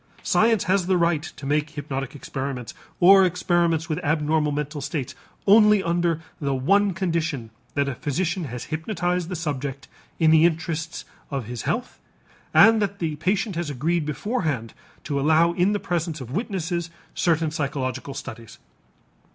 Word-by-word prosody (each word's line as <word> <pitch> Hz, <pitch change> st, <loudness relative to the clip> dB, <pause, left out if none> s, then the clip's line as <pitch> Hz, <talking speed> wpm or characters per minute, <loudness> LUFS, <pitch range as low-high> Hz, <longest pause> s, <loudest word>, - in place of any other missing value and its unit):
Science 225 Hz, -1 st, +3 dB
has 190 Hz, -2 st, +1 dB
the 185 Hz, -1 st, +3 dB
right 170 Hz, -3 st, +2 dB
to 150 Hz, -3 st, -9 dB
make 150 Hz, +2 st, +1 dB
hypnotic 140 Hz, -2 st, -5 dB
experiments, 135 Hz, -3 st, -5 dB, 0.3 s
or 190 Hz, +2 st, +8 dB
experiments 175 Hz, -2 st, +1 dB
with 165 Hz, +3 st, -3 dB
abnormal 150 Hz, 0 st, +1 dB
mental 150 Hz, +1 st, -3 dB
states, 140 Hz, -1 st, -3 dB, 0.3 s
only 210 Hz, -1 st, +6 dB
under 170 Hz, -1 st, +1 dB, 0.2 s
the 140 Hz, -2 st, -1 dB
one 195 Hz, +10 st, +3 dB
condition 165 Hz, -, -2 dB, 0.2 s
that 140 Hz, -1 st, +1 dB
a 140 Hz, -, -1 dB
physician 165 Hz, +6 st, -2 dB
has 125 Hz, -3 st, -6 dB
hypnotized 175 Hz, +1 st, -1 dB
the 185 Hz, -, -3 dB
subject 140 Hz, -4 st, -4 dB, 0.3 s
in 160 Hz, -2 st, +4 dB
the 160 Hz, 0 st, +6 dB
interests 165 Hz, -1 st, -1 dB, 0.2 s
of 135 Hz, -5 st, -3 dB
his 120 Hz, +1 st, -5 dB
health 245 Hz, +2 st, -3 dB, 0.5 s
and 225 Hz, -1 st, +6 dB
that 200 Hz, -1 st, -1 dB
the 160 Hz, -4 st, -2 dB
patient 190 Hz, +5 st, 0 dB
has 170 Hz, -2 st, -2 dB
agreed 155 Hz, +5 st, 0 dB
beforehand 150 Hz, -, -2 dB, 0.3 s
to 140 Hz, -2 st, -2 dB
allow 160 Hz, +4 st, +4 dB
in 180 Hz, +3 st, +2 dB
the 205 Hz, -, 0 dB
presence 170 Hz, -3 st, -2 dB
of 125 Hz, -2 st, -8 dB
witnesses 175 Hz, -, -2 dB, 0.2 s
certain 165 Hz, -2 st, +1 dB
psychological 140 Hz, -3 st, -3 dB
studies. 115 Hz, -5 st, -8 dB
160 Hz, 150 wpm, -24 LUFS, 145-180 Hz, 0.5 s, or